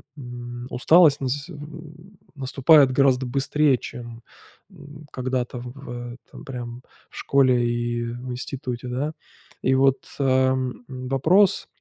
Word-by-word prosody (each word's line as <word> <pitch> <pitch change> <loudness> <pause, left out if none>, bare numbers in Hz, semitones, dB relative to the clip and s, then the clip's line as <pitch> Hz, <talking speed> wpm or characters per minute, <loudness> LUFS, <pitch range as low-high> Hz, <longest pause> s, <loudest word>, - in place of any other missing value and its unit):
м, 120 -2 -8
усталость 155 +2 +5
нас 135 +2 -2
с - - -16
м, 160 - -9
м, 155 +4 -12 0.2
наступает 135 +1 +4
гораздо 130 -1 +3
быстрее 140 +2 +2
чем, 120 -1 -9 0.5
м, 150 -4 -13
когда-то 125 -1 -3
в 120 -1 -8
этом - - -13
прям 120 -3 -7 0.3
в - - -14
школе, 130 -3 +3
и 120 0 -1
в 120 +2 -6
институте, 125 -1 -5
да. 140 +5 -2 0.5
И 130 - +3
вот, 135 0 +2
ам, 130 -2 +1
вопрос 135 +10 +2
130 Hz, 125 wpm, -23 LUFS, 125-145 Hz, 0.5 s, усталость